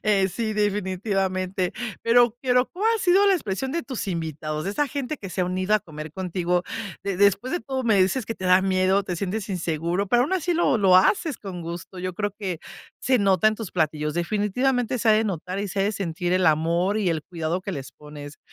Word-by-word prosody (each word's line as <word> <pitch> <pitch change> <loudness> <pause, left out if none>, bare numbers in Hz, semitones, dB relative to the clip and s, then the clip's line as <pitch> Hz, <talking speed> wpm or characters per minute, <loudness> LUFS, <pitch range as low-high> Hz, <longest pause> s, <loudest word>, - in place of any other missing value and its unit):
Eh, 200 -3 +3
sí, 220 +3 -3
definitivamente, 190 -2 -1 0.3
pero 235 0 +4
quiero 250 0 +2
¿cual 400 +5 -2
ha - - -6
sido 380 +2 +4
la 395 - +5
expresión 245 - -3
de 335 +1 -1
tus 255 -8 -5
invitados, 155 -3 -3
de 195 - -1
esa 290 +8 0
gente 280 +1 -3
que 195 -8 -8
se 185 - -3
ha - - +2
unido 185 +3 0
a 215 - +3
comer 155 -2 -9
contigo? 180 -1 -1 0.4
De 195 -2 -2
después 200 - +2
de 350 - -1
todo, 265 -1 -3
me 215 -4 +4
dices 215 +5 0
que 225 - -3
te 190 - -8
da 185 0 +5
miedo, 190 +1 +2
te 180 -2 -3
sientes 200 +3 -3
inseguro, 175 +1 -1
pero 240 +4 +4
aún 285 - -2
así 355 -2 0
lo 305 -6 +3
lo 190 -3 +6
haces 300 - +2
con 190 -4 -7
gusto, 170 +2 -7
yo 185 0 -4
creo 205 +1 -2
que 185 -5 -3 0.4
se 255 -1 +2
nota 195 -1 +3
en 215 - -1
tus 215 -3 -7
platillos, 150 -2 -1
definitivamente 220 +8 0
se 225 - 0
ha 220 - +8
de 220 +1 +3
notar 185 -1 -3
y 205 - -3
se 195 +2 -2
ha - - +3
de 210 - 0
sentir 175 -2 -2
el 185 0 +3
amor 170 +6 +2
y 200 - +1
el 160 -2 -2
cuidado 165 +1 -3
que 195 +1 -5
les 140 -5 -7
pones. 150 -1 -11
195 Hz, 225 wpm, -24 LUFS, 180-225 Hz, 0.4 s, ha